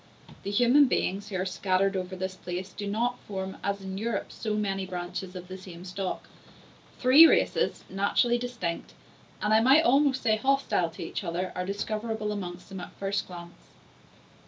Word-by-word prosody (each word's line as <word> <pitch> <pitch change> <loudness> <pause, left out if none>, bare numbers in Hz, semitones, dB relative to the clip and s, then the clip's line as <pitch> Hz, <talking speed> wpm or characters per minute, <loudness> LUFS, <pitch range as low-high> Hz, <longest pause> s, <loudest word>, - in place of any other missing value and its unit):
The - - -5
human 245 +7 +5
beings 200 -5 -1
who 200 - -5
are 185 0 0
scattered 190 +1 +1
over 185 0 -3
this 185 0 -3
space 180 +1 -6
do 205 -1 -5
not 235 +4 0
form, 190 -1 -5
as 200 0 -1
in 190 0 -5
Europe, 225 -2 -2
so 215 -2 -3
many 195 -2 -1
branches 180 0 -5
of 180 0 -7
the 185 +1 -8
same 180 -1 -10
stock. 185 0 -4 0.7
Three 275 +6 +8
races, - - +1
naturally 200 +5 +2
distinct, 235 -9 -4 0.5
and, 210 +1 +2
I 220 - +7
might 270 +7 +6
almost 275 0 +3
say, 220 -3 +3
hostile 265 -8 +1
to 165 - -8
each 165 - -4
other, 180 +1 -2
are 180 0 -3
discoverable 215 +2 -2
amongst 180 -3 -6
them 190 -1 -7
at - - -7
the - - -27
first 200 +1 -2
glance. 175 -1 -10
195 Hz, 180 wpm, -28 LUFS, 185-220 Hz, 0.7 s, Three